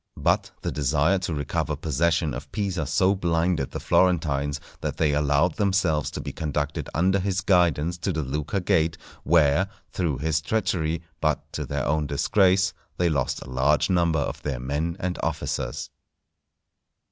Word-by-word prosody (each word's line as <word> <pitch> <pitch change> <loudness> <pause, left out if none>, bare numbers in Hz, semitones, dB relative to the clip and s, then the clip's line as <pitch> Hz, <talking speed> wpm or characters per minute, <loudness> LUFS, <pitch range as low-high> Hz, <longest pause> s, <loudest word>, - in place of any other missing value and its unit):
But - - +1
the - - -1
desire 75 +6 +2
to 90 -2 -3
recover 75 -1 -1
possession 80 +1 0
of - - -7
Pisa 95 -7 -2
so 95 +6 +3
blinded 85 -5 0
the - - -5
Florentines 75 -5 +2 0.2
that - - -3
they 75 -2 +2
allowed 75 +3 +2
themselves 95 -7 +1
to - - -6
be - - -5
conducted 75 -2 -3
under 95 +4 +3
his 95 0 -1
guidance 85 -2 +2
to 95 - -1
the 80 -3 -2
Lucca 75 +8 -2
Gate, 80 -2 +1 0.3
where, 80 +2 +4 0.2
through 80 -7 -1
his 75 +1 0
treachery, 80 -3 -1 0.2
but - - -1
to - - -4
their - - -2
own 75 0 +1
disgrace, 95 +6 +3 0.2
they 90 -1 +2
lost 70 -5 -1
a 65 - -11
large 70 +7 +2
number 85 -3 +2
of 70 - -2
their 70 -4 -3
men 75 +7 -2
and 90 -1 -3
officers. - - -3
80 Hz, 160 wpm, -25 LUFS, 75-90 Hz, 0.3 s, where